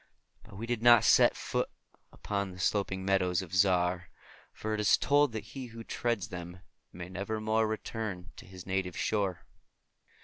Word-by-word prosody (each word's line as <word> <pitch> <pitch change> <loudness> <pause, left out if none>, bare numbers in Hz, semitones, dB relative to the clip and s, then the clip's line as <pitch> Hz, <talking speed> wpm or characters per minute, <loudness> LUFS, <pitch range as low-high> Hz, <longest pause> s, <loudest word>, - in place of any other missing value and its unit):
But - - -15
we 115 - -4
did 120 -1 -2
not 120 -1 +7
set - - +5
foot - - -2 0.4
upon 100 -1 -3
the 90 0 -11
sloping 95 0 0
meadows 95 -2 +1
of 90 -1 -12
Zar, 90 -1 +2 0.4
for 110 0 -4
it 110 - -2
is 105 - +4
told 145 -1 +3
that 110 -2 -4
he 130 -2 -6
who 115 0 -10
treads 115 -6 -2
them 90 0 -8 0.3
may 90 0 -8
nevermore 110 +4 -1
return 110 -4 -5
to - - -12
his 95 -2 -11
native 95 -2 -2
shore. 100 -5 -1
100 Hz, 165 wpm, -30 LUFS, 90-110 Hz, 0.4 s, not